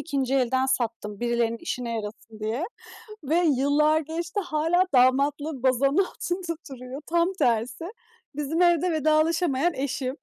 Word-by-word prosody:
2. 275 Hz, -4 st, -1 dB
elden 260 Hz, 0 st, +2 dB
sattım, 230 Hz, -5 st, -2 dB
birilerinin 235 Hz, -1 st, 0 dB
işine 245 Hz, -8 st, -3 dB
yarasın 215 Hz, +1 st, -8 dB
diye 225 Hz, +9 st, -2 dB, 0.6 s
ve 320 Hz, +5 st, +2 dB
yıllar 300 Hz, +2 st, +3 dB
geçti 335 Hz, +5 st, -4 dB
hâlâ 330 Hz, 0 st, +1 dB
damatlığı 275 Hz, +2 st, +2 dB
bazanın 275 Hz, +3 st, +2 dB
altında 350 Hz, -2 st, -4 dB
duruyor. 260 Hz, +2 st, -8 dB
Tam 340 Hz, +3 st, +1 dB
tersi, 240 Hz, +5 st, 0 dB, 0.5 s
bizim 300 Hz, +3 st, -1 dB
evde 345 Hz, 0 st, +3 dB
vedalaşamayan 315 Hz, 0 st, +2 dB
eşim. 265 Hz, -1 st, -3 dB
280 Hz, 125 wpm, -25 LUFS, 250-325 Hz, 0.6 s, yıllar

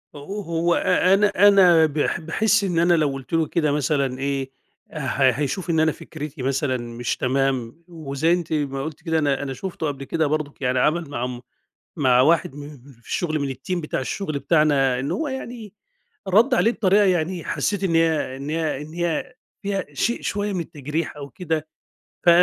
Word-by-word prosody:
أو 195 Hz, +9 st, -6 dB
هو 170 Hz, -1 st, 0 dB
أ 185 Hz, -, +3 dB
أنا 205 Hz, +1 st, +5 dB, 0.2 s
أنا 180 Hz, -5 st, +6 dB
باح 150 Hz, -1 st, -1 dB
باحس 215 Hz, +6 st, +1 dB
إن 175 Hz, -4 st, 0 dB
أنا 175 Hz, +1 st, +4 dB
لو 155 Hz, -3 st, +3 dB
قلت 135 Hz, +3 st, -9 dB
له 165 Hz, -1 st, +2 dB
كده 155 Hz, -3 st, +1 dB
مثلًا 140 Hz, -3 st, 0 dB
إيه، 135 Hz, -1 st, -2 dB, 0.4 s
ه 155 Hz, -, -6 dB, 0.3 s
هيشوف 150 Hz, +8 st, -3 dB
إن 160 Hz, -1 st, +2 dB
أنا 160 Hz, 0 st, +3 dB
فكرتي 150 Hz, -1 st, -8 dB
مثلًا 135 Hz, 0 st, 0 dB
مش 120 Hz, 0 st, -4 dB
تمام، 130 Hz, +2 st, -1 dB
وزي 160 Hz, -1 st, -1 dB
أنتِ 175 Hz, -2 st, -2 dB
ما 135 Hz, -3 st, -1 dB
قلتِ 155 Hz, +1 st, -7 dB
كده 160 Hz, -2 st, +1 dB
أنا 140 Hz, -2 st, 0 dB
أنا 135 Hz, -1 st, -4 dB
شُفته 175 Hz, +1 st, -4 dB
قبل 140 Hz, -1 st, -4 dB
كده 160 Hz, +3 st, 0 dB
برضه 150 Hz, -1 st, -2 dB
يعني 125 Hz, 0 st, +1 dB
عمل 160 Hz, +3 st, +1 dB
مع 145 Hz, -, -5 dB
عم 125 Hz, -1 st, -4 dB, 0.6 s
مع 130 Hz, -5 st, +4 dB
واحد 150 Hz, 0 st, +3 dB
من 145 Hz, 0 st, -8 dB
من 150 Hz, -, -11 dB
اللي 135 Hz, +2 st, -17 dB
في 115 Hz, -, -23 dB
الشغل 155 Hz, -3 st, -1 dB
من 140 Hz, -2 st, -2 dB
الTeam 175 Hz, +8 st, -3 dB
بتاع 155 Hz, -, -2 dB
الشغل 155 Hz, +3 st, -3 dB
بتاعنا 140 Hz, -5 st, +2 dB
إنه 135 Hz, -, -2 dB
هو 315 Hz, -1 st, -2 dB
يعني 240 Hz, -6 st, -7 dB, 0.5 s
ردّ 225 Hz, +8 st, +4 dB
عليه 230 Hz, -1 st, +3 dB
بطريقة 205 Hz, -2 st, +3 dB
يعني 180 Hz, -2 st, 0 dB
حسيت 200 Hz, -1 st, -1 dB
إن 175 Hz, -3 st, +1 dB
هي 160 Hz, -5 st, +1 dB
إن 140 Hz, +2 st, -6 dB
هي 155 Hz, -3 st, -1 dB
إن 155 Hz, +2 st, -10 dB
هي 175 Hz, +8 st, -2 dB, 0.3 s
فيها 195 Hz, -1 st, -2 dB
شيء 235 Hz, -, -1 dB
شوية 205 Hz, 0 st, -2 dB
من 185 Hz, -, -2 dB
التجريح 150 Hz, 0 st, -4 dB
أو 140 Hz, -1 st, -8 dB
كده 160 Hz, -4 st, -3 dB, 0.6 s
ف -, -, 0 dB
155 Hz, 195 wpm, -23 LUFS, 140-175 Hz, 0.6 s, أنا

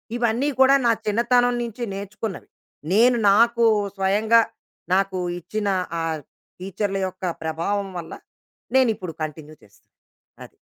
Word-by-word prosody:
ఇవన్నీ 240 Hz, +4 st, +1 dB
కూడా 265 Hz, +1 st, +6 dB
నా 235 Hz, -, +5 dB
చిన్నతనం 245 Hz, +3 st, +2 dB
నుంచి 235 Hz, +1 st, -6 dB
నేర్చుకున్నవి. 200 Hz, +1 st, -6 dB, 0.4 s
నేను 240 Hz, +4 st, +5 dB
నాకు 235 Hz, +3 st, +4 dB, 0.3 s
స్వయంగా 210 Hz, +4 st, +3 dB, 0.5 s
నాకు 195 Hz, 0 st, +1 dB, 0.2 s
ఇచ్చిన 210 Hz, +4 st, -4 dB, 0.3 s
ఆ -, -, -2 dB, 0.6 s
టీచర్ల 195 Hz, +2 st, -3 dB
యొక్క 185 Hz, 0 st, -11 dB, 0.2 s
ప్రభావం 180 Hz, +5 st, -2 dB
వల్ల 170 Hz, -2 st, -7 dB, 0.6 s
నేను 260 Hz, -2 st, +5 dB
ఇప్పుడు 185 Hz, -4 st, -7 dB
కంటిన్యూ 155 Hz, 0 st, -7 dB
చేస్తున్నాను. 100 Hz, -, -25 dB, 0.5 s
అది. -, -, -19 dB
205 Hz, 120 wpm, -23 LUFS, 190-235 Hz, 0.6 s, కూడా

